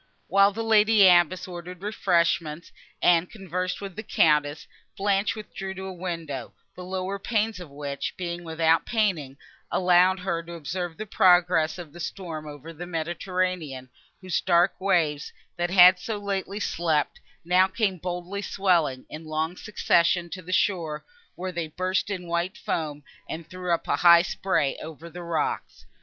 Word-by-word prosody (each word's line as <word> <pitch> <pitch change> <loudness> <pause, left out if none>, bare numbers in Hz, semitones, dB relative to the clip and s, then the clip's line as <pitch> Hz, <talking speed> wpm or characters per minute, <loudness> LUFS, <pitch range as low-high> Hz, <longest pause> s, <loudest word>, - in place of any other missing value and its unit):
While 200 +1 +4
the 225 +3 -4
lady 215 -2 +5
abbess 180 +1 +4
ordered 180 +1 -9
refreshment, 170 -5 0 0.3
and 175 0 +4
conversed 185 -2 -4
with 195 -3 -7
the - - -5
Countess, 150 -7 +2 0.3
Blanche 200 +1 +1
withdrew 195 -3 -7
to 190 - -7
a 190 - -6
window, 165 -8 -5 0.2
the 180 - -8
lower 190 +2 -3
panes 215 -1 -1
of 175 -4 -9
which, 140 0 -5
being 175 -1 -4
without 165 0 +2
painting, 180 - -1 0.3
allowed 180 +1 +4
her 170 -3 -1
to 170 +1 -10
observe 170 +1 -5
the 215 - -5
progress 175 -5 +3
of 165 -5 -9
the 175 - -11
storm 165 -3 -6
over 150 +2 -9
the 175 +3 -8
Mediterranean, 170 -5 -3 0.3
whose 185 -1 -1
dark 175 0 +2
waves, 165 -7 +1 0.2
that 175 0 -1
had 180 0 +7
so 215 +3 -4
lately 200 0 -3
slept, 160 -6 0 0.3
now 180 +2 +4
came 195 -1 -1
boldly 180 +3 -4
swelling, 170 -11 +1
in 155 +1 -9
long 155 +2 -2
succession, 175 -3 +1
to 185 - -6
the 185 +1 -9
shore, 165 -6 0 0.3
where 185 +1 -4
they 170 -2 -3
burst 185 +5 -1
in 185 -3 -4
white 170 +2 -2
foam, 150 -3 -3 0.3
and 165 0 -6
threw 180 -1 -5
up 170 - 0
a - - +1
high 170 -1 +7
spray 180 -7 0
over 160 +1 -9
the 175 - -8
rocks. 170 -3 -3
175 Hz, 160 wpm, -26 LUFS, 165-190 Hz, 0.3 s, had